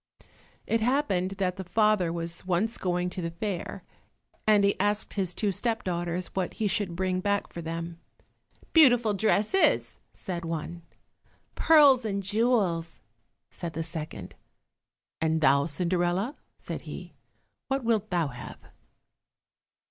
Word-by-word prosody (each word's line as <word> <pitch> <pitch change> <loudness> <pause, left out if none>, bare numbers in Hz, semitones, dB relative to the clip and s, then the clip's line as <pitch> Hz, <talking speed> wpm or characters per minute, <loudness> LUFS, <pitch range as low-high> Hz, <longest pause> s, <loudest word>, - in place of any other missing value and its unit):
It 225 0 0
happened 220 -7 +1
that 185 -1 -1
the 190 - -4
father 200 -1 +2
was 170 0 -4
once 190 +5 0
going 180 -1 -1
to 185 - -5
the 165 - -2
fair, 175 +1 -5 0.6
and 210 -2 +5
he 200 - +3
asked 205 +2 0
his 185 -3 -1
two 210 -2 0
step 225 +3 -1
daughters 175 0 -3
what 185 -2 -2
he 215 - 0
should 195 -3 0
bring 185 0 0
back 200 +1 -1
for 170 - -5
them. 165 +1 -5 0.7
"Beautiful 245 -9 +6
dresses," 215 - +2
said 175 -2 -5
one, 165 +1 -4 0.7
"Pearls 285 -6 +6
and 200 -2 -2
jewels," 195 -6 +1 0.5
said 170 -2 -6
the 165 - -3
second. 155 - -6 0.9
"And 160 0 +2
thou, 140 -1 +4
Cinderella," 175 - 0 0.2
said - - -6
he, - - -8 0.5
"what 270 -1 -1
wilt 220 -2 +1
thou 170 -5 0
have?" 120 -2 -9
185 Hz, 135 wpm, -28 LUFS, 170-215 Hz, 0.9 s, Beautiful